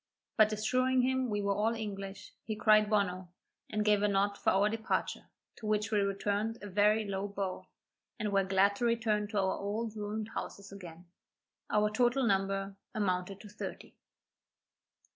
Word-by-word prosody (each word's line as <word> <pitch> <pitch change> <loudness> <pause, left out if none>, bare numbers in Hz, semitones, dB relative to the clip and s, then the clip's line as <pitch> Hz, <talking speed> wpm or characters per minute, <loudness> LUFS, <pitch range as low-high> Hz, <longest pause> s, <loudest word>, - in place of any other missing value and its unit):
But 215 -1 +5
assuring 255 +4 +2
him 260 0 +1
we 205 -1 -1
were 200 0 +2
all 220 +3 +1
English, 200 -2 -6
he 215 - -3
cried 215 -1 +4
Bonno, 190 -3 0 0.4
and 210 0 -1
gave 210 -1 +4
a 210 - +3
nod 200 0 +1
for - - 0
our 195 +2 +4
departure, 220 +1 -2 0.3
to 220 - -7
which 210 0 0
we 210 - +3
returned 205 +3 -1
a - - -5
very 210 +2 +3
low 200 0 -2
bow, 195 -2 -4 0.5
and 210 -3 -2
were 195 0 +4
glad 195 +1 +3
to 240 - 0
return 220 -3 +1
to 210 0 -4
our 190 -1 +1
old 215 +2 -3
ruined 210 +1 -4
houses 200 0 -6
again. 175 -3 -10 0.6
Our 210 0 +2
total 245 +4 +2
number 195 -1 0 0.2
amounted 190 -2 -1
to 215 - -11
thirty. 205 - -7
210 Hz, 165 wpm, -32 LUFS, 195-215 Hz, 0.6 s, But